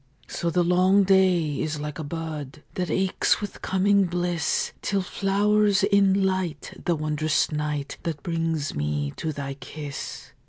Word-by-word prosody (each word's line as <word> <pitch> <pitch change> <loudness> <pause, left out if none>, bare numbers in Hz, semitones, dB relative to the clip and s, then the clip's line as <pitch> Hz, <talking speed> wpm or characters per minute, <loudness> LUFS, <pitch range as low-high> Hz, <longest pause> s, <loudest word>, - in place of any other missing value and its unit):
So 170 - -2
the 175 +1 +2
long 185 +3 +4
day 185 -6 +3
is 155 -1 -2
like 150 +1 -5
a - - -3
bud 155 -2 -6
That 180 -1 -2
aches 190 0 +2
with 205 -1 -6
coming 200 +1 +3
bliss, 175 -1 0
Till 195 -2 0
flowers 205 +1 +2
in 200 -1 +4
light 185 -6 -2
the 175 - +2
wondrous 155 0 0
night 150 -2 -3
That 160 -4 -4
brings 165 -3 -1
me 75 -1 -2
to 160 - -2
thy 140 -2 -5
kiss. 140 +1 -7
170 Hz, 150 wpm, -25 LUFS, 150-190 Hz, -, long